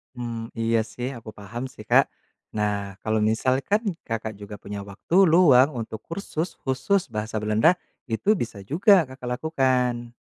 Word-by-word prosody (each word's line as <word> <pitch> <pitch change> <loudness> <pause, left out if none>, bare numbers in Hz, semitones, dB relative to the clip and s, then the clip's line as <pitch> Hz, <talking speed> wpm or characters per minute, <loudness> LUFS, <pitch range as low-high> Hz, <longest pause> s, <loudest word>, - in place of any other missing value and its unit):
Mmm, 115 -2 -5
iya 115 0 +2
sih 120 +3 -6
aku 115 -1 -10
paham 110 +5 -6
sih, 105 - -11
Kak. - - +6 0.5
Nah 100 -2 -2
kalau 110 0 0
misalkan 135 - +1
Kakak 110 -2 -3
juga 100 0 -9
punya 100 0 -6
waktu 100 - -5 0.2
luang 145 -6 +6
untuk 110 -1 -6
kursus 165 -1 -5
khusus 135 +9 0
bahasa 110 0 -3
Belanda, 110 +8 +4 0.4
itu 110 - -3
bisa 115 - -4
juga 185 +1 +5
Kakak 130 -1 -9
lakukan. 125 -6 0
120 Hz, 145 wpm, -25 LUFS, 110-140 Hz, 0.5 s, Kak